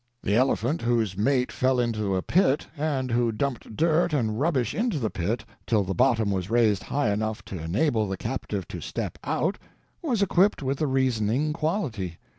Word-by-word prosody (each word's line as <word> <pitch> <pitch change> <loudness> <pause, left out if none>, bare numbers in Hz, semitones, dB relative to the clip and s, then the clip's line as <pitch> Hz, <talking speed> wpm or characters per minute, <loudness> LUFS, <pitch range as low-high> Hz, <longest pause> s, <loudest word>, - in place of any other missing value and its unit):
The 100 - +1
elephant 130 +4 +1
whose 115 -5 +1
mate 125 +5 +1
fell 130 0 +1
into 110 -5 0
a 95 - -1
pit, 150 -5 +2
and 140 -4 -1
who 120 -1 +2
dumped 115 -1 -3
dirt 165 +1 +2
and 110 -6 0
rubbish 135 -7 +1
into 225 -5 0
the 110 -6 -1
pit 100 +7 -2 0.2
till 110 -3 +3
bottom 115 -4 +2
was 95 -1 -2
raised 110 -4 +3
high 140 -7 0
enough 110 +1 -2
to 95 - -6
enable 110 - +1
the 95 0 -3
captive 100 -7 -4
to - - -6
step - - -4
out, 165 +9 -1 0.4
was 245 - +1
equipped 195 -3 +3
with 135 +1 -1
the 155 - +1
reasoning 130 +1 +1
quality. 140 - -2
120 Hz, 175 wpm, -26 LUFS, 105-145 Hz, 0.4 s, till